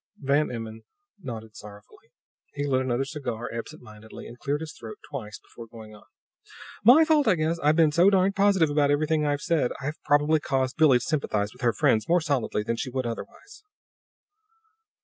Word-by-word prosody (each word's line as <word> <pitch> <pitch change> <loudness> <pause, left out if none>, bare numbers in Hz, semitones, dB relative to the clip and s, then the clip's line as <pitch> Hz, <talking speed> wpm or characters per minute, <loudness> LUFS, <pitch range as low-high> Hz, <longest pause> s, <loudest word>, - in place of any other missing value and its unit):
Van 140 +2 +1
Emmon 115 -2 -7 0.4
nodded 110 - -8
sorrowfully. 105 -1 -14 0.4
He 145 0 -2
lit 130 -2 +1
another 130 +1 -1
cigar 125 -5 -5
absent 120 +5 -8
mindedly 110 -1 -12
and 120 - -12
cleared 145 +2 -2
his 155 -1 -7
throat 215 - -10
twice 105 -9 -7
before 115 -1 -14
going 110 -2 -13
on: 105 - -16 0.8
"My 265 +9 +7
fault, 310 -2 +2
I - - +4
guess. 160 +1 -1
I've 150 0 +2
been 160 -2 +4
so 175 +5 +5
darned 195 0 +2
positive 195 -6 +3
about 145 -1 +2
everything 150 +1 +1
I've 145 -1 -1
said, 160 -7 +1
I've 150 +3 -6
probably 150 +1 +2
caused 130 -2 -2
Billie 155 -6 +5
to 125 - -6
sympathize 105 -9 -2
with 125 - -18
her 120 -3 +2
friends 110 +5 +1
more 175 +1 +4
solidly 140 -9 -2
than 115 +2 -3
she 130 - -4
would 130 0 -3
otherwise." 240 - -8
140 Hz, 185 wpm, -25 LUFS, 115-160 Hz, 0.8 s, My